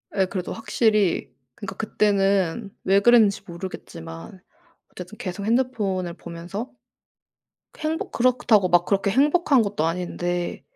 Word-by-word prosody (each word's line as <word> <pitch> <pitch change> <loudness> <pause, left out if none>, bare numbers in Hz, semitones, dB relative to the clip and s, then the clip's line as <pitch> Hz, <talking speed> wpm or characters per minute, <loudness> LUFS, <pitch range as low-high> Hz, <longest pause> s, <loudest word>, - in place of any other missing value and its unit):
예. 190 -2 +3
그래도 185 -1 -4
확실히 215 - +1 0.2
그러니까 205 - -7
그때는 200 -2 +1
왜 195 +1 +4
그랬는지 220 -2 +5
모르겠지만 170 0 -9 0.5
어쨌든 180 +4 -10
계속 190 +1 -5
핸드폰을 215 -7 0
보면서 175 +7 -7 1.1
행복 315 +1 -3
그렇다고 235 -5 +3
막 175 -1 +4
그렇게 200 0 +1
행복한 285 - +3
것도 200 -6 -2
아닌데 175 +1 -3
200 Hz, 300 characters per minute, -23 LUFS, 180-225 Hz, 1.1 s, 그랬는지